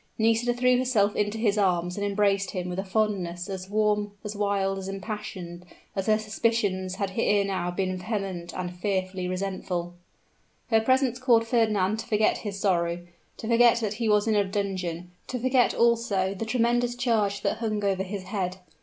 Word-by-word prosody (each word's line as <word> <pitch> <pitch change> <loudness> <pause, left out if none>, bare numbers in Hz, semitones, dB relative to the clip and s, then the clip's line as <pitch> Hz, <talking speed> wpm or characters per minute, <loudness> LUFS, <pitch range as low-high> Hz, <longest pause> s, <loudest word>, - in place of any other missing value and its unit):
Nisida 230 +2 +2
then 245 - -11
threw 250 0 +4
herself 220 -6 +2
into 210 +1 0
his 215 -2 +1
arms, 180 -2 +1
and 205 - -3
embraced 200 -1 +1
him 180 -2 -4
with 180 +1 -3
a - - -1
fondness 190 -4 -1
as 190 -1 -6
warm, 210 -1 +1
as 210 0 -5
wild, 200 -1 0
as 190 - -6
impassioned 195 -3 -6 0.3
as 195 0 -2
her 215 0 +4
suspicions 210 -4 0
had 195 -1 -3
ere 205 -3 +3
now 185 -2 -1
been 185 +1 -1
vehement 185 -3 -4
and 180 -1 -4
fearfully 185 -1 -2
resentful. 185 -2 -3 0.8
Her 225 0 +5
presence 260 +1 +2
caused 235 -3 +4
Fernand 215 -3 +1
to 225 - -6
forget 215 0 +2
his 200 -2 -5
sorrow 175 -3 0 0.3
to 220 - -6
forget 235 +1 +5
that 215 -2 -1
he 225 - +1
was 210 -1 +4
in 220 - +3
a 205 -1 +4
dungeon 185 -3 -3 0.2
to 255 - -3
forget, 255 0 +2
also, 225 -5 +2
the 200 +3 -4
tremendous 240 +1 +1
charge 220 -5 0
that - - 0
hung 215 -2 -1
over 195 -1 +1
his 190 0 -4
head. 185 -1 -3
205 Hz, 180 wpm, -26 LUFS, 185-225 Hz, 0.8 s, Her